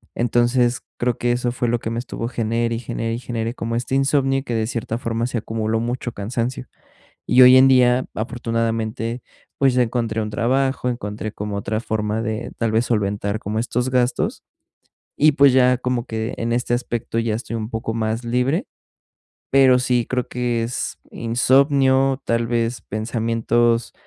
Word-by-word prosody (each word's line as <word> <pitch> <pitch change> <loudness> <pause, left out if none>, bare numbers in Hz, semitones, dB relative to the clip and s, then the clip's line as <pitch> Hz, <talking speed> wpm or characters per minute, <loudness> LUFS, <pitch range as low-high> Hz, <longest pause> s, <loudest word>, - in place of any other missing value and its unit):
Entonces, 120 +1 +2 0.2
creo 120 -1 0
que 120 0 0
eso 120 0 0
fue 120 -1 -1
lo 120 0 +1
que 110 - -4
me 115 - -3
estuvo 120 -1 -5
genere 115 0 -1
y - - -3
genere 115 -1 -3
y 115 - -3
genere 115 -2 -3
como 115 0 -3
este 125 +2 -2
insomnio 135 0 +2
que, 120 - -4
de 110 -1 0
cierta 115 -1 -3
forma, 115 -1 -2
se 125 -1 -2
acumuló 110 0 -2
mucho 120 +1 -3
cansancio. 120 +4 -3 0.6
Y 125 +1 +5
hoy 125 +1 +9
en 130 +1 +7
día, 125 -1 +4
afortunadamente, 115 0 -2 0.3
pues, 135 -2 +3
ya 125 - +3
encontré 115 -2 -1
un 105 - -3
trabajo, 130 +4 0
encontré 110 -3 -4
como 105 -1 -5
otra 110 +2 -2
forma 110 -1 -2
de 110 0 -4
tal 115 -1 0
vez 115 +2 +2
solventar 105 -1 -1
como 105 +2 -4
estos 120 +2 -1
gastos 125 -1 0 0.7
y, 150 +1 +5
pues, 140 -1 +6
ya 125 0 +4
como 125 -1 -2
que 110 0 -4
en 115 0 -1
este 120 0 0
aspecto 120 -2 -2
ya 115 -2 0
estoy 115 0 -5
un 110 -1 -4
poco 115 -1 -3
más 110 +1 -2
libre, 125 - 0 0.8
pero 130 -2 +5
sí 125 -1 +1
creo 125 -1 -1
que 120 -2 -1
es 120 +2 -4
insomnio, 135 +2 +2
tal 115 0 0
vez 115 0 -1
pensamientos, 115 +1 0
120 Hz, 170 wpm, -21 LUFS, 115-125 Hz, 0.8 s, hoy